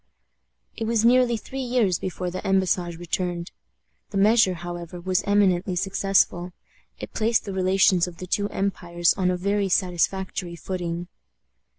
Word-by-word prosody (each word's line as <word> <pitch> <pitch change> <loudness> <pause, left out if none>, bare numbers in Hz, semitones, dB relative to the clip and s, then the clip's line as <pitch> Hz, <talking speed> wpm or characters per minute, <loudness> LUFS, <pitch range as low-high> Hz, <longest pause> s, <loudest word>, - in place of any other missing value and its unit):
It 225 - -3
was 225 0 +1
nearly 245 -1 +4
three 265 +5 -6
years 240 -8 +1
before 180 -1 -4
the 185 - -5
embassage 185 -3 0
returned. 175 0 -3 0.6
The 200 - -4
measure, 205 -2 +4
however, 175 0 -7
was 185 +1 0
eminently 190 -2 +2
successful. 185 -1 +1 0.4
It - - -8
placed 225 +1 +1
the 200 - -5
relations 185 -1 +3
of 175 -1 -10
the 185 - -7
two 205 +3 -1
empires 175 -3 0
on 185 -2 0
a 180 - 0
very 200 +2 0
satisfactory 180 0 -1
footing. 175 0 -4
185 Hz, 145 wpm, -24 LUFS, 175-200 Hz, 0.6 s, nearly